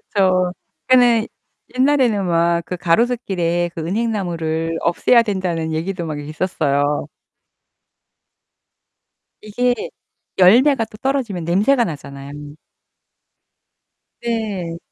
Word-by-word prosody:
그렇죠. 185 -2 +2 0.3
그니까는 245 -3 +4 0.5
옛날에는 255 -7 +2
막 170 0 +2
그 180 - -5
가로수길에 175 -3 0
그 165 - -4
은행나무를 170 -5 -2
없애야 230 +7 +3
된다는 175 -6 -2
얘기도 175 +2 -3
막 155 -2 -4
있었어요. 145 -2 -1 2.3
이게 245 +4 0 0.6
열매가 230 +7 +5
또 215 - -15
떨어지면 240 -9 -2
냄새가 215 +9 +3
나잖아요 140 -3 -8 1.9
네. 210 -8 -3
185 Hz, 225 characters per minute, -19 LUFS, 165-230 Hz, 2.3 s, 열매가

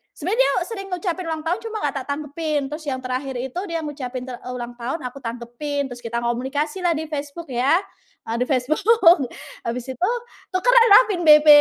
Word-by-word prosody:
Sebenarnya 385 +10 -2
dia - - +4
sering 390 -4 -6
ngucapin 360 0 -2
ulang 315 -1 -3
tahun 355 +6 0
cuma 445 -1 -5
nggak 285 -1 -1
tak - - -23
tanggepin, 295 +1 -2
terus 310 +1 -5
yang 260 - -1
terakhir 255 +1 -3
itu 260 +7 -4
dia 330 -1 -3
ngucapin 260 -4 -5
ter 250 -2 -7
eee, 250 - -7
ulang 240 0 -5
tahun 260 +5 -3
aku 250 +2 -6
tanggepin, 245 +4 -4
terus 245 - -7
kita 235 0 -3
komunikasilah 295 +8 -1
di 315 +1 -3
Facebook 290 +3 -5
ya, 260 +6 +3 0.5
eee, 230 - -1
di - - +3
Facebook, 335 - +4 0.5
habis 240 +1 -3
itu 355 - 0 0.5
tukeranlah 470 +1 +7
pin 350 -2 -1
BB, 300 0 +8
290 Hz, 185 wpm, -22 LUFS, 250-340 Hz, 0.5 s, BB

